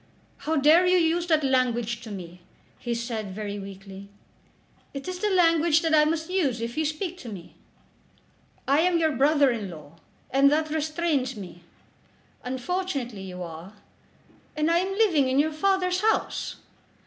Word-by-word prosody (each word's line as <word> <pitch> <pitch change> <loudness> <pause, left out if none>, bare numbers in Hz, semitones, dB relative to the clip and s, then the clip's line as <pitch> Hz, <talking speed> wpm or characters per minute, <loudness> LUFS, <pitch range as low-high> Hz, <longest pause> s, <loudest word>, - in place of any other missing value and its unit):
"How 320 - +1
dare 315 +5 +5
you 365 0 +4
use 340 0 +1
that 315 -3 +2
language 240 -4 0
to 230 - -9
me!" 180 -3 -9 0.4
he 240 -1 -3
said 225 -4 -4
very 205 -1 -5
weakly. 195 0 -10 0.9
"It 275 +3 -6
is 365 -1 -4
the 425 - 0
language 335 -3 +3
that 325 -1 +1
I 300 -1 +6
must 320 +1 -1
use 325 -11 0
if 230 +1 -4
you 315 - 0
speak 335 +4 -3
to 245 - -8
me." 185 -5 -10 1.1
"I 280 +2 +4
am 350 +1 +3
your 320 -1 +2
brother 285 0 +3
in 215 -5 -4
law, 160 -1 -12 0.3
and 275 +1 +5
that 310 +1 0
restrains 310 -4 -1
me." 175 -4 -10 0.8
"Unfortunately 260 - -3
you 180 -1 -7
are." 170 +3 -9 0.8
"And 305 +2 +1
am 360 +3 +1
living 330 -12 +3
in 260 - +1
your 305 +2 +2
father's 370 +2 +1
house." 440 +1 0
285 Hz, 160 wpm, -26 LUFS, 220-330 Hz, 1.1 s, I